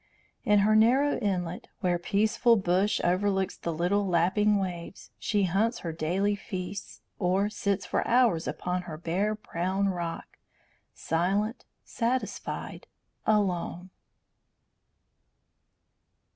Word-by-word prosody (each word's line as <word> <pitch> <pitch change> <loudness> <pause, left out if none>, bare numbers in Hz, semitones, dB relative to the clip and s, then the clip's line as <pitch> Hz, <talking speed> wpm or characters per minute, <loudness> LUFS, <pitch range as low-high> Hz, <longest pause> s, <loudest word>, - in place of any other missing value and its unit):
In 210 - +4
her 215 0 +4
narrow 255 +7 +4
inlet, 180 -4 -2
where 175 -3 +1
peaceful 215 +5 +3
bush 190 0 +1
overlooks 190 +1 +1
the 170 - -4
little 180 +5 +1
lapping 190 +4 +3
waves, 180 -2 -5
she 205 -2 +1
hunts 205 +6 +1
her 165 - -1
daily 180 +6 0
feasts, 195 0 -6 0.2
or 195 +3 +1
sits 200 -2 -1
for - - -1
hours 235 -9 +3
upon 180 0 -2
her 155 - -6
bare 185 +6 -1
brown 190 0 -1
rock, 170 -3 -5 0.6
silent, 195 +8 -1 0.2
satisfied, 250 +2 -3 0.4
alone. 185 -3 0
195 Hz, 105 wpm, -28 LUFS, 175-210 Hz, 0.6 s, In